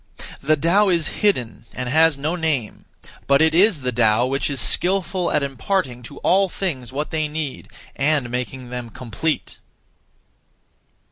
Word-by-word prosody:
The 155 +2 +2
Tao 180 +7 +3
is 170 -3 +1
hidden, 125 - 0
and 125 0 -4
has 160 +2 +4
no 155 +5 -2
name; 155 -10 -2 0.4
but 140 0 +5
it 160 0 +4
is 180 -2 +4
the 125 0 -1
Tao 115 0 +3
which 135 +1 -1
is 140 -2 -2
skilful 180 +4 +1
at 145 - +1
imparting 135 - -2
(to 140 - -11
all 195 +1 +4
things 135 - -4
what 145 +3 -4
they 155 -1 0
need) 150 -2 -5 0.3
and 140 -3 +1
making 125 0 -5
them 125 -1 -5
complete. 130 +7 -4
145 Hz, 150 wpm, -21 LUFS, 125-170 Hz, 0.4 s, but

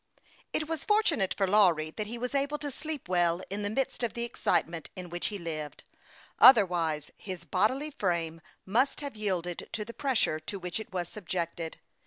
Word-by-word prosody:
IT 310 - -1
was 325 -2 -3
fortunate 345 - +3
for 195 - +3
Lawry 180 -6 +4
that 210 +4 -4
he 235 +3 -5
was 250 +2 -3
able 280 +2 0
to 290 -1 -4
sleep 305 - -5
well 175 -1 +2
in 200 +1 -2
the 205 - -1
midst 260 +5 -1
of 235 -2 -1
the 235 - -2
excitement 170 -8 0
in 180 -1 -7
which 175 0 -1
he 205 - -4
lived; 155 -4 -5 0.6
otherwise 175 - +6
his 185 -3 -7
bodily 260 +11 +1
frame 170 - -1 0.2
must 250 +10 +2
have 280 -4 -5
yielded 180 -5 -2
to 210 -2 -3
the 235 - -8
pressure 250 - +1
to 200 - -6
which 180 +1 -3
it 220 - -8
was 180 -2 -2
subjected. 170 -4 -4
200 Hz, 185 wpm, -30 LUFS, 175-245 Hz, 0.6 s, otherwise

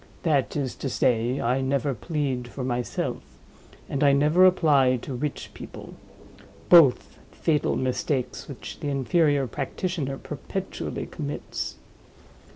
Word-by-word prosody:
That 145 -6 +1
is 135 -4 -1
to 135 - -3
say, 120 +1 +1
I 125 +3 +1
never 135 +1 0
plead 130 +1 -2
for 130 +2 -6
myself; 125 -1 -2 0.7
and 140 +1 -1
I 140 -1 +6
never 155 +6 +5
apply 140 -8 +4
to 135 - -5
rich 140 +3 -4
people—both 160 -8 +1
fatal 150 -3 0
mistakes 130 0 -2
which - - -8
the - - -4
inferior 145 +1 +2
practitioner 140 +2 -3
perpetually 185 +8 -5
commits. 145 -4 -5
140 Hz, 115 wpm, -25 LUFS, 130-150 Hz, 0.7 s, I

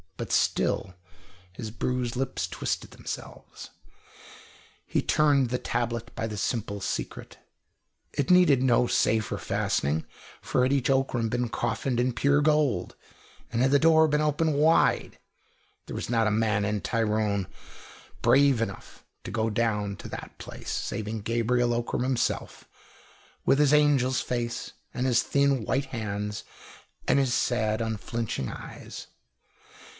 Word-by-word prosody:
But - - -5
still 95 -2 +1 0.6
his 110 +3 -6
bruised 125 +1 -2
lips 130 -8 -2
twisted 85 -2 -3
themselves. - - -8 1.1
He - - 0
turned 145 -4 +3
the 125 - 0
tablet 120 -1 -2
by 115 - -2
the 105 -1 -6
simple 100 -1 -2
secret. 95 - -5 0.8
It 140 - -1
needed 180 -8 +6
no 125 -1 +4
safer 110 -2 +1
fastening, 75 +3 -1 0.4
for - - 0
had 130 +2 +2
each 135 -2 +1
Ockram 130 -4 +1
been 120 +1 -1
coffined 120 +2 -1
in 125 0 +1
pure 140 +4 +3
gold, 150 - +1 0.6
and 115 - 0
had 130 +1 +3
the 140 - +5
door 160 0 +5
been 150 0 +1
open 150 +1 +1
wide, 155 +3 +3 0.7
there - - -6
was - - -4
not 115 -2 +2
a - - +2
man 105 -1 +1
in 105 -1 -1
Tyrone 105 -4 0 0.8
brave 135 -3 +5
enough 100 -4 -6 0.2
to - - -6
go 115 0 0
down 105 -3 0
to - - -9
that - - -8
place, - - -8
saving 110 0 -3
Gabriel 120 +2 +1
Ockram 120 +1 -1
himself, 130 -2 -1 0.8
with 135 - +4
his 150 -1 +4
angel's 140 -4 +3
face 120 -1 -3 0.2
and 125 - -1
his 125 -2 +4
thin, 140 -3 +2
white 130 +6 0
hands, 105 -4 -4 0.6
and - - +4
his 130 -3 +1
sad 110 -3 +1
unflinching 110 - -3
eyes. - - -9
120 Hz, 140 wpm, -27 LUFS, 110-135 Hz, 1.1 s, needed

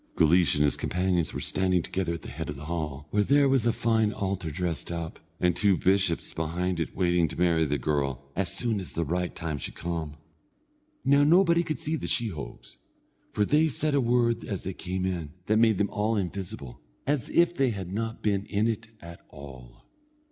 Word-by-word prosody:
Guleesh 85 0 +4
and 75 - +3
his 75 -3 +2
companions 90 -3 0
were - - -4
standing 90 -2 +1
together 90 -3 -2
at 85 - -6
the - - -8
head 80 +4 -5
of 75 - -4
the 70 +2 -9
hall, 75 -3 -4
where 105 - +3
there 140 +5 +4
was 135 -4 +3
a - - +4
fine 110 -2 +1
altar 95 -5 -3
dressed 85 +1 -3
up, 85 -2 -5 0.2
and 90 -1 +2
two 100 -3 +3
bishops 95 -3 +1
behind 85 +3 -2
it 80 - -3
waiting 90 -2 +2
to 80 - -7
marry 85 -2 +3
the 75 0 0
girl, 70 -1 -1
as 90 -1 +2
soon 115 -1 +1
as 95 - -5
the 85 - -1
right 90 +3 -2
time 80 -3 -4
should - - -5
come. 80 -3 -4 0.9
Now 140 +1 +5
nobody 170 +2 +5
could 155 -3 -3
see 160 +2 -2
the - - -5
sheehogues, 75 - -3 0.5
for 105 - +1
they 150 +5 +3
said 150 +1 0
a 140 - +3
word 115 -1 +2
as 100 -4 -4
they 95 - -4
came 95 +1 -3
in, 85 -6 -3
that 110 +2 +2
made 110 -3 +4
them 100 +1 0
all 110 +2 0
invisible, 90 -9 -5 0.2
as 140 -4 -1
if 170 0 +3
they 135 -6 +2
had 95 -4 -5
not 115 +2 -3
been 100 -2 0
in 105 +2 +1
it 115 0 -2
at 85 0 -10
all. 65 -3 -12
95 Hz, 205 wpm, -27 LUFS, 80-115 Hz, 0.9 s, Now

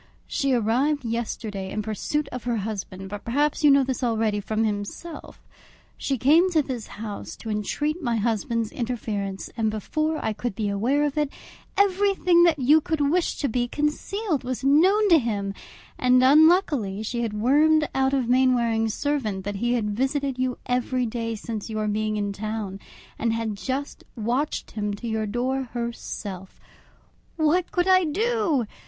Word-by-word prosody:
She 275 -1 -1
arrived 255 +4 +1
yesterday 220 -4 -3
in 215 +2 -3
pursuit 245 +8 -2
of 250 -1 -6
her 240 -1 0
husband, 195 -3 -5
but 205 +1 -7
perhaps 290 +6 0
you 295 - +7
know 275 -1 +6
this 260 0 -3
already 220 -3 +1
from 215 +2 -1
himself. 210 +10 -5 0.5
She 270 - -2
came 315 +10 +5
to 320 -4 +2
this 250 -5 -5
house 210 -1 -7
to 220 - -6
entreat 295 - -2
my 240 -5 0
husband's 225 0 -1
interference, 215 -5 -4
and 225 -2 +1
before 310 +9 -1
I 220 - 0
could 235 -1 -4
be 210 -1 -1
aware 240 +9 +1
of 295 0 0
it, 295 -2 +1 0.5
everything 385 -3 +3
that 330 -3 +3
you 295 +4 +5
could 295 -2 0
wish 360 0 +1
to 285 - +1
be 240 0 0
concealed 300 - -1
was 255 0 -4
known 370 +10 +4
to 335 -3 +7
him, 205 -5 -2 0.5
and 255 0 +4
unluckily 285 - +4
she 235 +2 -2
had 230 -3 -2
wormed 300 +8 +3
out 265 0 +2
of 260 -3 0
Mainwaring's 235 -3 +2
servant 240 -10 -1
that 205 -1 -3
he 240 +4 0
had 210 -3 -1
visited 270 +3 -1
you 255 -1 0
every 250 0 0
day 230 0 -3
since 220 0 -6
your 215 -1 -2
being 215 0 -1
in 205 -1 -2
town, 210 -1 -4 0.4
and 230 -1 +1
had 225 -2 -2
just 265 +7 -4
watched 245 +6 -2
him 210 -1 -2
to 235 +3 -7
your 220 -1 -1
door 255 +5 -1
herself! 210 -5 -6 0.8
What 335 +3 +1
could 355 0 +1
I 370 -1 +5
do! 385 - +1
245 Hz, 165 wpm, -25 LUFS, 215-295 Hz, 0.8 s, you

